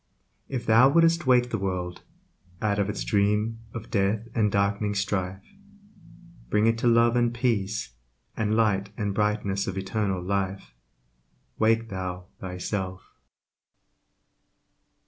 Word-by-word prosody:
If 130 -3 -3
thou 115 +4 +6
would'st 165 0 +3
wake 125 -1 +4
the - - -1
world 90 -2 -3 0.6
Out 105 -1 0
of 100 0 +1
its 105 - -3
dream 105 +2 +1
of 115 -2 -8
death 105 +2 0
and 105 -3 +2
dark'ning 100 +1 0
strife, 95 -2 -2 1.1
Bring 105 +1 +2
it 115 0 +2
to 120 - +1
Love 115 0 +4
and 120 -1 +2
Peace, 110 - -1 0.4
And 110 0 0
Light 100 -3 +2
and 100 -2 -1
brightness 105 -1 0
of 95 0 -3
immortal 95 -1 -1
Life, 95 -2 -2 0.9
Wake 115 +1 +2
thou 90 -2 -5
thyself. 95 0 -4
105 Hz, 125 wpm, -26 LUFS, 95-115 Hz, 1.1 s, thou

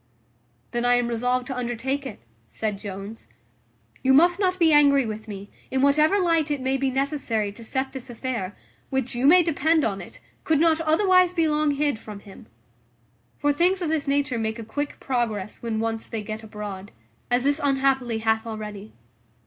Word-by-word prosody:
"Then 240 0 -1
I 245 0 +4
am 245 -1 +1
resolved 250 +2 0
to 265 - -5
undertake 250 +3 -2
it," 215 - -10 0.3
said 210 -3 -3
Jones. 200 +2 -8 0.7
"You 265 0 +4
must 345 +5 +5
not 370 -2 +1
be 330 -3 +4
angry 280 -2 +5
with 220 0 -6
me, 200 -1 -8 0.2
in 265 +1 0
whatever 305 +7 +4
light 330 -4 +2
it 290 -1 -1
may 260 +1 0
be 270 0 0
necessary 260 -6 -1
to 230 +3 -11
set 265 +3 -2
this 265 -2 -8
affair, 230 -5 -4 0.3
which, 265 -2 -1
you 245 +3 +1
may 355 +4 +7
depend 320 0 +2
on 200 -3 -2
it, - - -12 0.2
could 315 -2 +2
not 325 0 +3
otherwise 365 +2 +4
be 330 -3 +2
long 300 0 +1
hid 285 -4 0
from 210 -2 -10
him: 195 -1 -14 0.9
for 290 +1 +1
things 360 +5 +2
of 325 - -1
this 310 -2 -1
nature 275 -3 0
make 220 0 -2
a 230 - -7
quick 285 +6 -4
progress 220 -6 -2
when 225 -2 -2
once 225 0 -2
they 220 -2 -4
get 215 +1 -6
abroad, 210 -3 -7 0.4
as 245 0 +2
this 285 +2 +1
unhappily 265 -4 +1
hath 220 0 0
already. 210 -2 -7
260 Hz, 185 wpm, -24 LUFS, 220-295 Hz, 0.9 s, may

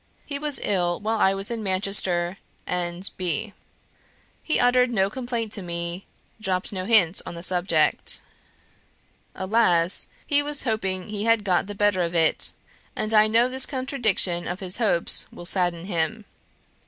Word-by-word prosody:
He 280 -1 -5
was 295 -1 -1
ill 175 -4 0
while 220 +1 -1
I 195 -1 +3
was 195 +3 -4
in 230 -1 -3
Manchester 185 -2 +1 0.3
and 180 +1 -1
B. 200 +4 -2 0.9
He 310 - 0
uttered 250 0 +4
no 195 -4 +1
complaint 240 -3 -4
to 205 - -1
me; 170 +1 -4 0.3
dropped 185 -2 -2
no 185 -1 -4
hint 195 -5 +4
on - - -8
the 170 - -8
subject. 180 0 +1 1.1
Alas 185 -3 +3 0.2
he 290 -1 +2
was 290 0 -3
hoping 195 -6 -2
he 210 0 -3
had 230 -2 +3
got 190 -1 +1
the 205 - -7
better 205 -2 +2
of 170 0 -2
it, 165 -1 +4 0.4
and 215 +1 -2
I 215 0 +6
know 225 +2 +3
how 250 - 0
this 260 0 +2
contradiction 230 -10 0
of 175 +2 -4
his 185 -1 -2
hopes 210 -7 +2
will 175 - -10
sadden 175 -2 -1
him. 200 +4 -2
195 Hz, 160 wpm, -24 LUFS, 180-225 Hz, 1.1 s, I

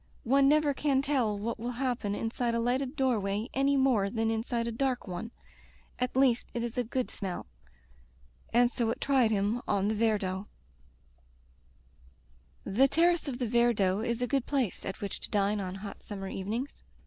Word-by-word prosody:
One 275 +3 +4
never 300 -1 +3
can 275 -1 +1
tell 255 -8 +1
what 225 +3 -3
will 240 +2 -3
happen 240 -5 -1
inside 230 +1 -1
a - - +1
lighted 255 +4 0
door 260 -5 +2
way 200 +4 -2
any 275 +1 +2
more 245 -7 +3
than 225 +1 0
in 220 0 0
side 235 -1 -1
a 235 - -2
dark 255 0 -1
one. 185 +5 -5 0.7
At 250 0 -1
least 260 -3 +3
it 235 - -1
is 235 -1 -4
a 245 - +1
good 250 +2 -2
smell/' 190 -3 -5 1.1
and 240 +1 +4
so 235 -3 0
it 230 - -2
tried 265 -5 +3
him 210 +3 0
on 200 0 +1
the - - +1
Viardot. 205 -3 0 2.2
The 255 +8 +3
terrace 335 +3 +2
of 260 -3 -3
the 245 -2 -1
Viardot 220 -4 +2
is 235 +1 -1
a - - 0
good 270 0 0
place 265 -9 -1
at 190 - -5
which 200 - -4
to - - -8
dine 205 0 +1
on 185 -1 -4
hot 200 +1 -8
summer 195 -2 -6
evenings. 220 +9 -4
235 Hz, 185 wpm, -30 LUFS, 205-260 Hz, 2.2 s, One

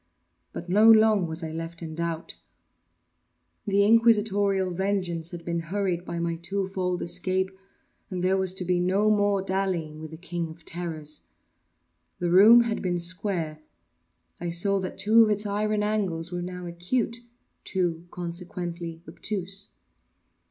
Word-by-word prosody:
But 170 - -7
not 215 +5 +7
long 215 -4 +4
was 160 +1 -6
I 160 - -4
left 165 +1 -6
in 160 -1 -6
doubt. 170 0 -4 1.3
The 200 0 +3
Inquisitorial 205 -4 +3
vengeance 180 -3 -1
had 170 -1 -9
been 170 -1 -1
hurried 180 0 -2
by 170 - -4
my 170 0 -1
two 190 +3 -3
fold 180 -2 -2
escape, 185 +2 0 0.6
and 180 -2 -4
there 185 +1 +3
was 190 -1 0
to 185 - -3
be 180 0 +1
no 195 +4 +2
more 205 -2 +2
dallying 185 -5 -2
with 155 - -7
the 160 - -10
King 175 -1 -4
of 160 0 -13
Terrors. 160 -3 -3 0.9
The 175 -1 -1
room 215 +6 +8
had 230 -2 -1
been 180 -2 0
square. 170 -3 0 0.8
I 175 - -3
saw 195 +4 +3
that 185 -1 -5
two 220 +2 +5
of 220 - +2
its 210 0 0
iron 210 +1 0
angles 190 -6 -1
were 175 0 -3
now 180 0 -6
acute—two, 185 -3 -3
consequently, 175 -1 -6
obtuse. 195 -1 -4
180 Hz, 145 wpm, -26 LUFS, 170-200 Hz, 1.3 s, room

